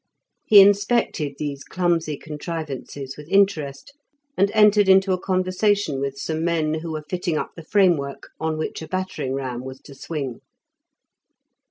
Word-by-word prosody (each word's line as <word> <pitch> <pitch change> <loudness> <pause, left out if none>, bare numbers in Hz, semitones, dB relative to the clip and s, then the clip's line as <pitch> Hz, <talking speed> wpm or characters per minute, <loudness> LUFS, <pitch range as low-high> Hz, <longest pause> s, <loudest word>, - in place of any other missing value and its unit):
He 205 -2 +9
inspected 200 - +2
these 140 -2 -4
clumsy 170 -4 -1
contrivances 150 -3 -6
with 150 +1 -12
interest, 190 - +1 0.4
and 200 - +3
entered 210 -2 +5
into 190 0 +5
a 185 - -1
conversation 185 -3 0
with 140 0 -3
some 160 +3 -3
men 165 -2 0
who 160 0 -6
were 155 -1 -5
fitting 180 -2 -2
up - - -3
the 165 - -9
framework 170 -7 +1
on 160 0 -2
which 155 - -4
a 160 - -7
battering 185 -8 -3
ram 130 -2 -4
was 130 0 -8
to 140 - -13
swing. 135 -3 -5
160 Hz, 150 wpm, -23 LUFS, 140-190 Hz, 0.4 s, He